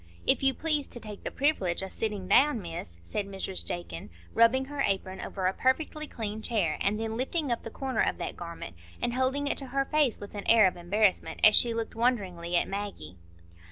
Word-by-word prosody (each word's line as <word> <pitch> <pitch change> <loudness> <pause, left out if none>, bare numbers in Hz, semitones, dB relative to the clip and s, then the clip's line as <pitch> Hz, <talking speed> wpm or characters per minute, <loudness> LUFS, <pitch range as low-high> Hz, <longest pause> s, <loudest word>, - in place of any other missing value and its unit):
"If - - +5
you 270 -1 +2
please 305 -3 +1
to 240 - -8
take 210 -3 -9
the - - -2
privilege 195 - 0
o' - - -3
sitting 205 -2 -3
down, 260 +5 +5
Miss," 165 - -7
said 195 - -3
Mrs 190 - -3
Jakin, 85 -1 -6 0.2
rubbing 235 +3 +4
her 285 +1 -4
apron 190 -4 -1
over 190 -2 -4
a 185 - +2
perfectly 305 +5 0
clean 220 -3 -4
chair, 205 -9 0
and 205 +2 +1
then 225 0 -3
lifting 275 +2 -1
up 235 - -1
the - - -7
corner 260 -1 -2
of - - +1
that - - -4
garment 170 - -8 0.2
and 240 - -1
holding 260 +3 +1
it 285 - 0
to 270 - -7
her 275 +1 0
face 295 -6 +2
with 205 - -9
an 205 -1 -6
air 225 -2 +7
of 185 - +2
embarrassment, 190 +3 +1
as 215 - +8
she 240 - +6
looked 230 -1 -3
wonderingly 190 -8 0
at - - +1
Maggie. 195 - -5
215 Hz, 210 wpm, -29 LUFS, 185-260 Hz, 0.2 s, as